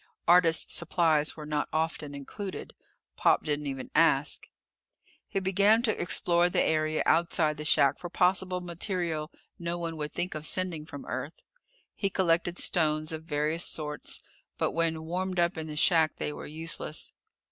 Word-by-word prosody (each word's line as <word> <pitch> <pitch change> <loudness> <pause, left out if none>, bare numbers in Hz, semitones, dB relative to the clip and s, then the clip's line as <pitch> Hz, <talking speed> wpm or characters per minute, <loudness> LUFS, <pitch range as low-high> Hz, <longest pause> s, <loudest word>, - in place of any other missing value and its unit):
Artists' 170 -2 +4
supplies 165 -3 +1
were 155 - -7
not 150 -1 -2
often 155 -2 -2
included. 190 +8 -7 0.4
Pop - - +3
didn't 150 -1 -2
even 135 -2 -5
ask. - - +2 0.8
He 195 - -1
began 200 +4 +3
to 220 -3 0
explore 175 0 +2
the - - +2
area 155 0 +1
outside 160 -2 +2
the 150 - -6
shack 140 -2 +3
for 175 - -6
possible 180 0 +1
material 170 -3 -3 0.3
no 170 0 -3
one 165 -1 -4
would 150 -1 -4
think 175 +1 -3
of 155 0 -1
sending 175 -5 -1
from 145 - -9
Earth. 130 +5 -6 0.5
He 195 - -1
collected 175 -2 +1
stones 155 -2 +2
of 160 0 -6
various 155 +2 0
sorts, 150 -1 -4 0.3
but - - 0
when 165 -1 0
warmed 180 +2 -2
up 170 +1 +2
in 160 -1 -5
the 155 - -6
shack 160 0 +3
they 150 - -3
were - - -8
useless. 155 0 -3
165 Hz, 160 wpm, -29 LUFS, 150-175 Hz, 0.8 s, Artists